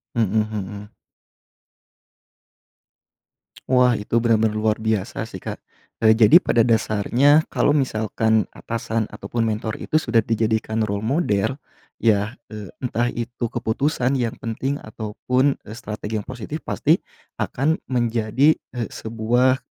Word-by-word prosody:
Mhm 110 -2 +2
mhm. 105 -1 -5 2.7
Wah, 125 -1 +4
itu 110 +2 0
benar-benar 110 -2 +2
luar 110 0 +1
biasa 110 0 -2
sih 110 -4 -8
Kak. - - -6 0.5
Eee, 110 - +7
jadi 115 - +6
pada 120 - +1
dasarnya, 120 +7 +3
kalau - - +2
misalkan 110 -5 +1
atasan 115 -1 -3
ataupun 115 -1 -3
mentor 110 0 -3
itu - - -4
sudah 120 -7 +3
dijadikan 110 0 0
role 100 -1 -1
model, 115 - 0 0.4
ya, 105 +1 +1 0.2
eee, 105 -2 -7 0.2
entah 120 -1 0
itu 120 0 -4
keputusan 125 +3 0
yang 115 -2 -1
penting 125 +5 -3
ataupun, 125 +5 -1
eee, 105 - -9
strategi 110 -2 -4
yang 105 - -10
positif, 130 +5 -6
pasti, - - +2 0.4
akan 150 +5 0
menjadi, 120 +3 +2 0.2
eee, 120 -2 -3
sebuah, 120 +4 +1
115 Hz, 120 wpm, -22 LUFS, 110-125 Hz, 2.7 s, Eee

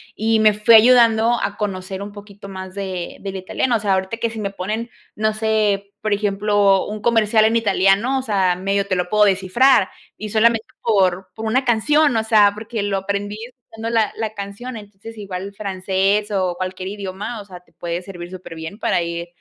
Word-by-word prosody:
Y 220 +1 +1
me 215 -1 +5
fue 210 +3 +4
ayudando 230 0 +6
a 200 - -2
conocer 190 -2 -4
un 205 +1 -6
poquito 200 -1 -12
más 190 -1 -8
de 190 -3 -5
del 195 -1 -6
italiano, 195 +6 -1
o - - +1
sea, 205 -2 +1
ahorita 190 +4 -2
que 230 0 -2
si 225 - -7
me 200 -2 -2
ponen, 210 +5 -4 0.3
no 215 0 0
sé, 210 -2 0
por 215 - -2
ejemplo, 205 -1 +2
un 210 0 -6
comercial 220 -2 +3
en 225 +1 +2
italiano, 225 +3 +2
o 260 - -2
sea, 195 -6 +1
medio 195 +2 -1
te 190 - 0
lo 180 -1 -2
puedo 210 +1 +4
descifrar 195 +5 +3 0.3
y 215 - -6
solamente 225 +1 +2 0.2
por 190 -4 +1
por 225 - -6
una 250 +5 +1
canción, 285 +3 +3
o 220 - +1
sea, 215 -2 +5
porque 220 +1 -5
lo 200 -1 -1
aprendí 200 +2 -3
escuchando 230 -2 -8
la 225 -2 +2
la 220 -1 -3
canción, 200 +5 -7
entonces, 210 +1 -11
igual 195 0 -6
francés 195 +1 -1
o 185 -3 0
cualquier 185 0 -4
idioma, 200 +3 -6
o - - -13
sea, 185 -3 -11
te 180 - -31
puede 170 0 -4
servir 175 -2 -9
súper 185 -3 -9
bien 160 +6 -8
para 175 - +1
ir 170 0 -4
205 Hz, 200 wpm, -20 LUFS, 190-220 Hz, 0.3 s, ayudando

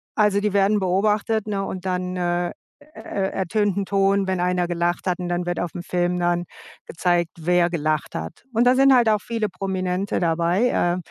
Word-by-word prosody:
A 215 - +3
also 205 -1 +2
die 210 0 0
werden 200 +1 +3
beobachtet, 210 +3 +1
ne, 200 -2 -2
und 185 -1 -6
dann, 180 0 -2
äh, 175 0 -1 0.3
er 300 +1 -15
er 195 -1 -2
ertönt 200 +1 0
'n 200 - 0
Ton, 195 0 +2
wenn 185 -1 -1
einer 180 0 +1
gelacht 175 0 -1
hat, 180 0 0
und 180 -1 -4
dann 175 0 -1
wird 175 - -1
auf'm 175 - -3
dann 175 - -6
Film 175 -1 0 0.4
gezeigt, 175 0 0
wer 175 +1 +2
gelacht 155 -2 -1
hat. 80 - -7
Und 230 +2 +3
da 250 - +6
sind 270 +1 +6
halt 240 -3 +4
auch 210 -1 +2
viele 230 -2 -2
Prominente 190 0 -2
dabei, 170 +7 +1
äh, 175 -5 +1
185 Hz, 200 wpm, -22 LUFS, 175-205 Hz, 0.4 s, da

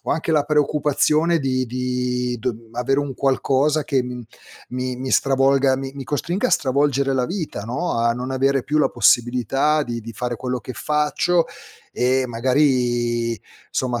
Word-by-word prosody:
ho - - -2
anche 165 - -1
la 150 -2 +3
preoccupazione 150 +2 +2
di 130 -2 0
di 125 0 -2
d 115 -1 -4
avere 125 +4 0
un 140 -2 -4
qualcosa 140 +3 +1
che, 135 -4 +1
mhmm, 125 0 -6 0.5
mi 125 0 -3
mi 130 +1 -5
stravolga 135 0 +3
mi 135 0 -5
mi 140 -1 -7
costringa 175 - -1
a - - -4
stravolgere 140 -3 +1
la 130 -1 +1
vita, 170 - -4
no, 130 - -2
a 115 0 +2
non 125 +2 -5
avere 135 0 +1
più 150 - -1
la 150 - +3
possibilità 125 +6 +2
di 120 -4 -4
di 115 +1 -8
fare 120 +1 -3
quello 125 +1 -3
che 130 - -7
faccio, 150 +6 +1 0.5
e 130 +1 +1
magari, 120 -2 +1 0.3
somma, 125 -2 -1
130 Hz, 165 wpm, -21 LUFS, 125-145 Hz, 0.5 s, la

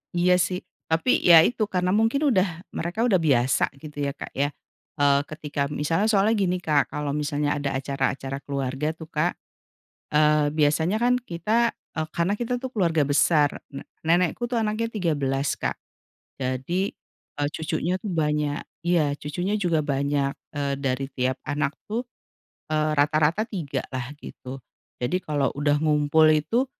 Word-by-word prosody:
iya 180 +1 +4
sih, 180 +1 0 0.3
tapi 165 +10 +2
ya 165 -2 +8
itu, 215 -1 0
karena 180 -1 0
mungkin 225 +7 +2
udah 185 -4 0
mereka 180 +7 -2
udah 195 -6 +3
biasa 130 -5 +3
gitu 150 -2 -10
ya - - -1
Kak - - -8
ya, 140 +1 0 0.5
eee, 140 -1 +5
ketika 145 -2 -3
misalnya 165 +8 0
soalnya 215 +1 +3
gini 185 -2 +1
Kak, 145 -5 +2
kalau 150 -1 -2
misalnya 145 0 -1
ada 140 -1 -2
acara-acara 135 0 -2
keluarga 140 +2 -3
tuh 160 -1 -10
Kak, 160 +4 +1 0.8
eee, 150 -1 +3
biasanya 160 +5 +2
kan 245 +1 +3
kita, 230 +1 0 0.2
eee, 155 0 -2
karena 170 +4 0
kita 240 +3 -3
tuh 260 - -4
keluarga 170 -7 +2
besar. 145 0 +2
Ne 140 - -7 0.2
nenekku 175 +7 +2
tuh 235 - +1
anaknya 220 +1 0
13 145 -9 0
Kak, - - -2 0.7
jadi, 130 +8 -1 0.6
eee, 145 0 0
cucunya 160 +2 -2
tuh 215 - -5
banyak. 150 -4 0 0.2
Iya, 155 -5 +3
cucunya 175 +8 -2
juga 165 -5 +1
banyak, 140 0 0 0.2
eee, 140 -1 -1
dari 135 -1 -1
tiap 130 0 0
anak 145 0 -1
tuh, 220 +3 -2 0.7
eee, 155 0 +2
rata-rata 155 +7 +3
3 175 - -4
lah 125 0 -3
gitu. 130 -2 -9 0.4
Jadi 135 +10 -1
kalau 145 -4 -1
udah 145 0 +1
ngumpul 150 0 +3
itu, 190 - +1
155 Hz, 150 wpm, -25 LUFS, 145-180 Hz, 0.8 s, ya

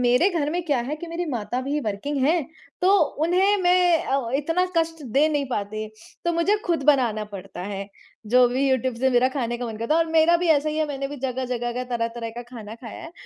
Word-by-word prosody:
मेरे 250 +9 +4
घर 310 -5 -1
में 350 +3 -1
क्या 285 -6 +1
है 300 - -2
कि 340 - -8
मेरी 335 +1 -3
माता 240 0 -2
भी 285 +3 -2
वर्किंग 260 +8 -2
है 330 +5 +3 0.4
तो 370 - +4 0.3
उन्हें 375 +5 +3
मैं 355 -2 +4
अ, 265 -4 -1
इतना 330 +5 +1
कष्ट 325 -1 0
दे 285 +5 +4
नहीं 290 -2 0
पाती 215 -2 -3 0.4
तो 345 - +1
मुझे 335 +5 +2
खुद 335 -5 0
बनाना 245 -7 +3
पड़ता 195 -3 -9
है। 195 0 -5 0.4
जो 250 +3 +5
भी 265 +3 +1
यूट्यूब 260 -1 +1
से 260 +3 +1
मेरा 250 +1 +4
खाने 240 -3 -2
का 245 - -3
मन 225 -2 -6
करता 230 +7 0
है 330 - +4
और - - -9
मेरा 325 +1 +5
भी 355 - -1
ऐसा 305 -1 +3
ही 305 - -2
है 310 0 +1
मैंने 275 -1 -3
भी 290 - -7
जगह-जगह 250 -2 -2
का, 250 +1 -3
तरह-तरह 230 -1 -3
का 240 +2 -7
खाना 225 -3 -9
खाया 230 -1 -10
है 330 - -10
265 Hz, 230 wpm, -24 LUFS, 235-325 Hz, 0.4 s, जो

